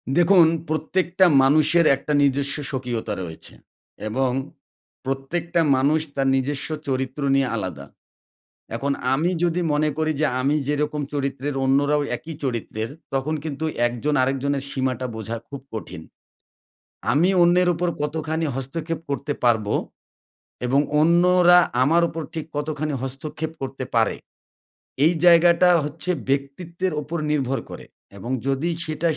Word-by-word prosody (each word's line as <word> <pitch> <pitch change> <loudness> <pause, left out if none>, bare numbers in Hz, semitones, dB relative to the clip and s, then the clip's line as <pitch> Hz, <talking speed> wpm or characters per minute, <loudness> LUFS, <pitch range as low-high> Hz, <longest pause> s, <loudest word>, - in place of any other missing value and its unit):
দেখুন 175 -1 +6 0.2
প্রত্যেকটা 175 +4 +1 0.2
মানুষের 155 +4 +4
একটা 150 +2 -4
নিজস্ব 140 0 +1
স্বকীয়তা 120 -5 -3
রয়েছে 80 -2 -8 0.5
এবং 130 +3 0 0.7
প্রত্যেকটা 165 +6 -1 0.2
মানুষ 145 +4 +3 0.2
তার 135 -1 +1
নিজস্ব 140 +2 -2 0.2
চরিত্র 130 +1 -2
নিয়ে 135 -1 +2
আলাদা। 90 -10 -4 0.9
এখন 140 +4 -1 0.2
আমি 155 +6 +1
যদি 175 0 +1
মনে 155 +1 +2
করি 155 0 +1
যে - - +4 0.2
আমি 140 +3 +2
যেরকম 150 0 -1
চরিত্রের, 140 0 -2
অন্যরাও 145 +2 +2
একই 160 +4 -8
চরিত্রের। 115 -3 -3 0.2
তখন 135 +4 -1
কিন্তু 155 0 -4 0.2
একজন 120 +5 -2
আরেকজনের 135 +1 -1
সীমাটা 130 -2 -2
বোঝা 110 +1 -4
খুব 140 -2 -7
কঠিন। 110 -7 -7 1.1
আমি 160 +6 +3
অন্যের 180 +1 +4
উপর 175 +2 -1
কতখানি 160 +2 -2
হস্তক্ষেপ 155 +5 -4
করতে 140 +1 -2
পারবো 110 -4 +2 0.9
এবং 135 +3 +3 0.2
অন্যরা 175 +2 +5 0.2
আমার 165 +6 +4
উপর 165 0 -5
ঠিক 160 -2 -3
কতখানি 150 0 -2
হস্তক্ষেপ 150 +4 -5
করতে 135 0 -4
পারে, 115 -2 +2 0.9
এই 165 - +4
জায়গাটা 175 +1 +6
হচ্ছে 155 +5 -6 0.2
ব্যক্তিত্বের 165 +6 -2
ওপর 155 +4 -5
নির্ভর 135 -3 0
করে। - - -9 0.3
এবং 115 +6 -6 0.2
যদি 135 +5 0 0.2
সেটা 155 +2 -1
145 Hz, 125 wpm, -23 LUFS, 135-160 Hz, 1.1 s, দেখুন